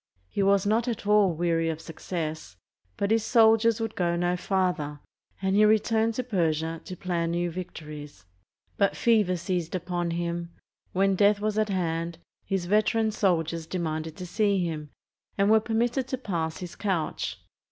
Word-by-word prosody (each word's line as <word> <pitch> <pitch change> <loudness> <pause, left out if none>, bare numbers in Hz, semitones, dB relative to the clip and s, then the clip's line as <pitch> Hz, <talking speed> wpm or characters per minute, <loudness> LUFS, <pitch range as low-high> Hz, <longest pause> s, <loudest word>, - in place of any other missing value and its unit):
He - - -2
was 195 0 +3
not 225 +4 +2
at 230 -4 -3
all 210 -2 +5
weary 165 0 0
of 160 -1 -3
suc 160 0 -11
cess, 160 - -4 0.4
but 200 +1 0
his 225 -1 +3
soldiers 225 -1 +4
would 225 -1 -3
go 170 -2 +1
no 175 +1 +1
farther, 180 -6 -1 0.4
and 190 0 +2
he 210 - +6
returned 220 +1 +3
to 255 - -1
Persia, 165 -7 -1
to 185 - -6
plan 170 -2 -1
new 175 0 -1
victories. 150 - -8 0.5
But 200 -1 +2
fever 210 -6 +3
seized 175 -1 -2
upon 175 -1 -2
him. 170 0 -3 0.4
When 195 +1 +2
death 205 +2 +4
was 215 0 0
at 215 -1 +1
hand, 170 -3 -1 0.3
his 195 -2 -2
veteran 215 +3 +2
soldiers 165 -5 0
demanded 160 -3 -3
to 180 - -6
see 200 0 +1
him, 155 -3 -4 0.5
and 200 +1 +3
were 220 - +7
permitted 235 +4 0
to 260 - -2
pass 170 -9 -3
his 180 -2 -7
couch. 185 -7 -2
185 Hz, 165 wpm, -27 LUFS, 165-210 Hz, 0.5 s, were